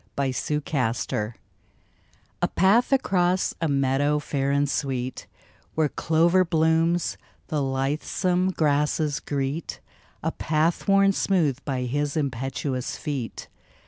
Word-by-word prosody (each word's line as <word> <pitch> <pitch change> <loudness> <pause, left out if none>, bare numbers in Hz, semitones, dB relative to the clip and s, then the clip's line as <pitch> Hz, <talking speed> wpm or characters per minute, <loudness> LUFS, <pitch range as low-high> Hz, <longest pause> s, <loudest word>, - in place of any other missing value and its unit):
TWO 140 +2 -1
PATHS 120 -8 -1 1.1
A - - +3
PATH 210 +8 +3
across 185 -8 +2
a 165 - +2
meadow 140 +1 +2
fair 140 -2 -1
and 140 +1 +2
sweet, 130 -2 -3 0.5
Where 155 -2 +2
clover 170 +5 +3
blooms 165 0 +1 0.3
the 150 -2 0
lithesome 150 +7 0
grasses 150 -2 +1
greet, 140 +3 -3 0.4
A - - 0
path 160 +4 0
worn 195 0 +5
smooth 165 -9 +1
by 130 -3 -2
his 145 +4 -1
impetuous 130 -1 -2
feet. 135 -6 -5
150 Hz, 110 wpm, -25 LUFS, 135-170 Hz, 1.1 s, worn